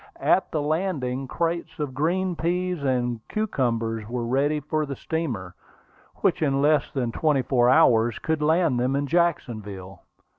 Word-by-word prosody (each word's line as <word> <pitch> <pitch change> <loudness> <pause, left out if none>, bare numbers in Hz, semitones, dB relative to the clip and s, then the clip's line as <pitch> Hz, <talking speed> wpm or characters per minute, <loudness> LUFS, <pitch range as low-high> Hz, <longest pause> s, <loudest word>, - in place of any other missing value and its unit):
At 190 - +2
the 155 -2 -2
landing, 145 -5 -1
crates 170 +4 -2
of 145 -4 -3
green 175 +6 0
peas 180 0 -1
and 125 -3 0
cucumbers 115 - -1
were 120 -1 -2
ready 140 +5 +1
for 155 +1 -2
the 140 - -4
steamer, 120 - -4 0.7
which 180 -2 +2
in 140 -3 +1
less 150 0 +3
than 125 -5 -2
twenty 145 0 +1
four 125 -2 +3
hours 120 -6 +4
could 160 -1 -2
land 160 -4 +2
them 130 +2 +1
in 140 +1 0
Jacksonville. 110 - -2
140 Hz, 150 wpm, -25 LUFS, 120-165 Hz, 0.7 s, hours